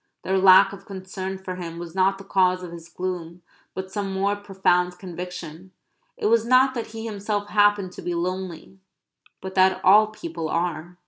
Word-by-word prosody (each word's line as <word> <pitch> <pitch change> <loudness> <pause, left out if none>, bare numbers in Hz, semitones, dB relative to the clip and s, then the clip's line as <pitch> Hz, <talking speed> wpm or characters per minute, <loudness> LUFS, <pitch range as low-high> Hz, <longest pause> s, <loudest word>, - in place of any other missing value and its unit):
Their 190 0 +1
lack 190 +1 +7
of 195 0 -12
concern 190 0 -6
for 185 -1 -7
him 170 -2 -6
was 170 -1 -8
not 190 +1 +2
the 195 - -11
cause 185 -2 +2
of 175 - -7
his 170 0 -10
gloom; 180 -1 -5 0.3
but 190 0 -5
some 200 -1 -3
more 195 +1 0
profound 180 -3 0
conviction 180 -1 -8 0.4
it - - -4
was 225 +1 +4
not 255 +2 +4
that 235 -3 -4
he 225 0 -7
himself 205 -1 -3
happened 205 -3 +3
to - - -10
be 175 - -3
lonely, 185 +1 -4 0.6
but 190 0 -6
that 190 0 +4
all 210 +3 +7
people 165 -6 -6
are. 170 +1 -3
190 Hz, 180 wpm, -24 LUFS, 180-200 Hz, 0.6 s, lack